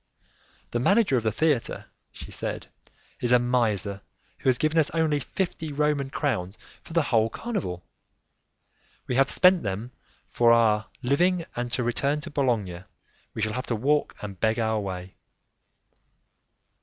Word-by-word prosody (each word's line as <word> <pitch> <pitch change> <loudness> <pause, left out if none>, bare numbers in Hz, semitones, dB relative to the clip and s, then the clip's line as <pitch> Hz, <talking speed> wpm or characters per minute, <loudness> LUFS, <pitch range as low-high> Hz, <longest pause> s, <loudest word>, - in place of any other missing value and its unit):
"The 120 - 0
manager 195 - +3
of 120 - +2
the 110 -1 0
theatre," 150 -2 0 0.3
she - - -10
said, - - -4 0.5
"is 120 - 0
a 125 - +8
miser 110 -5 0 0.4
who - - +1
has 125 - +3
given 155 +3 +2
us 155 - +2
only 155 -3 +2
fifty 160 0 -3
Roman 145 -1 0
crowns 110 - -2 0.2
for - - -12
the 165 -1 +3
whole 115 -5 +2
carnival. 160 - -4 1.2
We - - -3
have 135 +2 +3
spent 180 -1 +5
them 105 +4 -4 0.4
for 120 -1 +3
our 110 -2 +3 0.2
living, 170 +7 +2
and, 120 0 -3
to 125 - 0
return 140 +5 0
to 165 +1 -9
Bologna, 105 -10 -1 0.5
we 110 - -2
shall 110 0 -1
have 125 - -4
to 115 - 0
walk 145 +7 +1
and 100 -2 -7
beg 110 0 +1
our 110 -2 +1
way." 95 -2 -6
125 Hz, 155 wpm, -26 LUFS, 110-150 Hz, 1.2 s, a